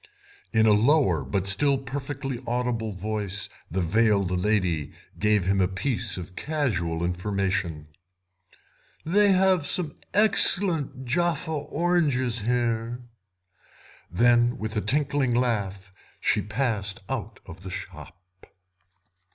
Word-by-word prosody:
In 110 Hz, -1 st, +3 dB
a 110 Hz, -, +6 dB
lower, 110 Hz, -, +3 dB
but 90 Hz, +9 st, -2 dB
still 135 Hz, +9 st, +3 dB
perfectly 135 Hz, -1 st, -5 dB
audible, 120 Hz, -2 st, -1 dB
voice 100 Hz, 0 st, -3 dB, 0.2 s
the 95 Hz, +3 st, -1 dB
veiled 100 Hz, +1 st, +2 dB
lady 90 Hz, -6 st, 0 dB, 0.3 s
gave 105 Hz, -3 st, +2 dB
him 95 Hz, +1 st, +2 dB
a 90 Hz, -, +3 dB
piece 110 Hz, +1 st, -3 dB
of 90 Hz, 0 st, -8 dB
casual 90 Hz, -, -1 dB
information. 95 Hz, -3 st, -2 dB, 1.2 s
"They 200 Hz, +5 st, +4 dB
have 185 Hz, -5 st, +3 dB
some 170 Hz, -4 st, -1 dB
excellent 180 Hz, -9 st, +3 dB
Jaffa 170 Hz, +5 st, 0 dB
oranges 145 Hz, -6 st, 0 dB
here." 120 Hz, +1 st, -1 dB, 1.1 s
Then 120 Hz, +5 st, +3 dB
with 110 Hz, -1 st, -5 dB
a 105 Hz, -, +1 dB
tinkling 140 Hz, -2 st, +1 dB
laugh 100 Hz, -6 st, -1 dB, 0.3 s
she -, -, +1 dB
passed 105 Hz, -1 st, -2 dB
out 115 Hz, -5 st, -5 dB
of 90 Hz, 0 st, -11 dB
the 95 Hz, -, -8 dB
shop. 90 Hz, -1 st, -8 dB
115 Hz, 110 wpm, -26 LUFS, 95-140 Hz, 1.2 s, a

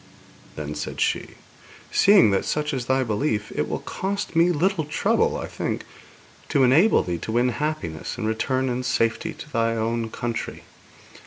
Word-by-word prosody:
Then 75 Hz, -1 st, -5 dB
said 75 Hz, 0 st, -5 dB
she: -, -, -1 dB, 0.6 s
'Seeing 195 Hz, -, +6 dB
that 100 Hz, -, +1 dB
such 150 Hz, -1 st, -1 dB
is 125 Hz, -3 st, -3 dB
thy 130 Hz, 0 st, +2 dB
belief, 110 Hz, -1 st, -1 dB
it -, -, -1 dB
will -, -, -3 dB
cost 195 Hz, -1 st, -3 dB
me 170 Hz, +2 st, +5 dB
little 175 Hz, +1 st, +1 dB
trouble, 150 Hz, -, +1 dB
I -, -, -4 dB
think, -, -, -4 dB, 0.6 s
to 140 Hz, -, +3 dB
enable 155 Hz, -, +5 dB
thee 85 Hz, -2 st, -3 dB
to 110 Hz, -, -5 dB
win 120 Hz, +2 st, +3 dB
happiness, 140 Hz, -, -3 dB
and 115 Hz, -, -3 dB
return 130 Hz, +4 st, 0 dB
in 125 Hz, 0 st, -1 dB
safety 125 Hz, +5 st, 0 dB
to 150 Hz, -, -11 dB
thy 115 Hz, 0 st, +1 dB
own 115 Hz, 0 st, -1 dB
country. 120 Hz, 0 st, -4 dB
125 Hz, 165 wpm, -24 LUFS, 110-150 Hz, 0.6 s, Seeing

